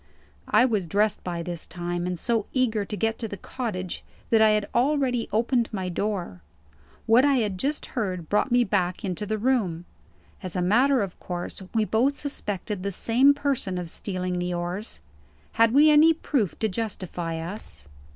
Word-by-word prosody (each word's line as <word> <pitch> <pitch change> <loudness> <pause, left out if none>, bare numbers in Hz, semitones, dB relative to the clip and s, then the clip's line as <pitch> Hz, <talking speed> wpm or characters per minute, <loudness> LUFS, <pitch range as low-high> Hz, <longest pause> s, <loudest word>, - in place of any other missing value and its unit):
I 245 - +5
was 210 -8 0
dressed 205 +4 +1
by 170 -2 -3
this 170 -2 -5
time, 175 0 -3
and 180 -2 -3
so 225 -1 0
eager 225 -6 +1
to 210 - -5
get 225 +1 0
to 225 - -3
the 200 - -7
cottage, 185 -5 -5 0.3
that 225 -1 +5
I 220 - +7
had 210 -1 +1
already 255 -2 +1
opened 235 +1 +1
my 190 -4 -3
door. 180 - -3 0.6
What 230 +3 +5
I 285 -1 +4
had 210 -7 0
just 290 +6 -1
heard 185 - -2
brought 210 - +1
me 245 0 +5
back 185 -3 -1
into 190 +2 -3
the 215 +1 -1
room. 205 -8 0 0.6
As 185 -4 -3
a 180 - 0
matter 245 +6 +4
of 190 -2 -7
course, 175 +2 -5
we 220 -1 +3
both 255 +7 +1
suspected 205 -8 -4
the 200 +1 -2
same 250 +8 +4
person 275 -10 -1
of 175 -2 -5
stealing 185 -2 -3
the 180 0 -2
oars. 175 +5 -4 0.5
Had 230 0 +4
we 295 +4 +6
any 310 +2 +7
proof 255 - -1
to 220 - 0
justify 185 -5 -4
us? 170 - -6
210 Hz, 180 wpm, -25 LUFS, 180-240 Hz, 0.6 s, I